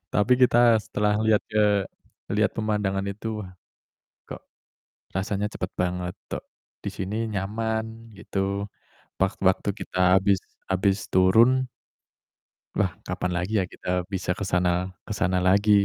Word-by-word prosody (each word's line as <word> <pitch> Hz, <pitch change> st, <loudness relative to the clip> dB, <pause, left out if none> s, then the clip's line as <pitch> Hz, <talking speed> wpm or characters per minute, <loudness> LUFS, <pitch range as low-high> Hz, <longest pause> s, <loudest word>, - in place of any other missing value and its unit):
Tapi 105 Hz, +5 st, +4 dB
kita 120 Hz, -2 st, +6 dB
setelah 105 Hz, 0 st, 0 dB
lihat 110 Hz, -1 st, +4 dB
ke 105 Hz, -2 st, +2 dB, 0.4 s
lihat 105 Hz, +1 st, +2 dB
pemandangan 105 Hz, -3 st, -1 dB
itu, 110 Hz, +2 st, -4 dB
wah, 90 Hz, -, -11 dB, 0.8 s
kok -, -, -8 dB, 0.7 s
rasanya 100 Hz, +1 st, -1 dB
cepet 90 Hz, -, -4 dB
banget, 90 Hz, 0 st, -1 dB, 0.2 s
kok -, -, -4 dB, 0.4 s
di -, -, -2 dB
sini 105 Hz, +5 st, -2 dB
nyaman, 110 Hz, +3 st, -3 dB
gitu. 100 Hz, 0 st, -2 dB, 0.6 s
Wak 95 Hz, +2 st, 0 dB
waktu 95 Hz, +2 st, +3 dB
kita 90 Hz, -2 st, +3 dB
habis 95 Hz, 0 st, +2 dB, 0.3 s
habis 95 Hz, +1 st, +1 dB
turun 115 Hz, +8 st, +5 dB, 1.1 s
wah, -, -, +1 dB, 0.2 s
kapan 90 Hz, -, -2 dB
lagi 90 Hz, +4 st, -2 dB
ya 95 Hz, -, +2 dB
kita 90 Hz, 0 st, -2 dB
bisa 90 Hz, -1 st, -1 dB
ke 105 Hz, -, -5 dB
sana 90 Hz, +1 st, +1 dB, 0.2 s
ke 105 Hz, -, -3 dB
sana 90 Hz, -1 st, +1 dB
lagi, 100 Hz, +3 st, +3 dB
100 Hz, 135 wpm, -25 LUFS, 95-110 Hz, 1.1 s, kita